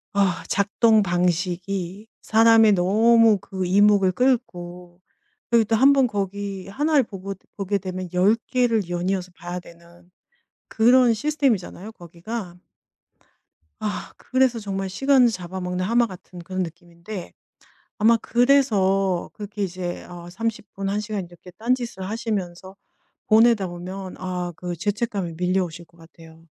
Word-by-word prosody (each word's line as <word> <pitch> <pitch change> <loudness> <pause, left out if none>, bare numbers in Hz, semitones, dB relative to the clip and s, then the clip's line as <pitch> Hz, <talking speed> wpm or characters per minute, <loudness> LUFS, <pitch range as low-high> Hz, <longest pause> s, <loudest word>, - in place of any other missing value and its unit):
어 - - +1 0.3
작동 215 +2 +3
방식이 180 +1 -2 0.2
사람의 225 -1 +5
너무 220 +4 +4
그 190 0 -5
이목을 200 0 +4
끌고 180 -7 -2 0.5
그리고 235 -1 +4
또 225 - +1
한번 270 +3 +5
거기 200 -2 -4
1 295 +10 -1
를 285 - +6
보고 195 -3 -7 0.2
보게 200 0 -1
되면 185 0 -5
10 190 +5 +4 0.2
개를 230 -7 +1
연이어서 180 +1 -2
봐야 175 +1 -6
되는 170 +1 -18 0.6
그런 245 +1 +4
시스템이잖아요 225 - -1
거기가. 175 +1 -8 1.2
아 210 -1 -4
그래서 260 -2 +1
정말 195 -2 -4
시간을 270 +5 +4
잡아먹는 185 -2 -4
하마 235 +3 +2
같은 185 -2 -12
그런 185 +2 -3
느낌인데 170 +3 -9 0.6
아마 230 +1 +4
그래서 200 -8 +2
그렇게 205 0 -6
이제 180 -1 -4
어 175 -1 -10
30 215 +2 -4
분, 195 0 -3
1 205 +1 -1
시간 210 -2 -4
이렇게 175 +1 -15
딴 230 +7 0
짓을 235 -6 -6
하시면서 195 -4 -4 0.5
보내다 220 -2 +4
보면 185 +2 -7
아 180 -1 -4
그 175 +1 -5
죄책감이 205 -2 -2
밀려오실 180 -2 -1
것 170 +1 -27
같아요 165 0 -17
195 Hz, 270 characters per minute, -23 LUFS, 180-225 Hz, 1.2 s, 를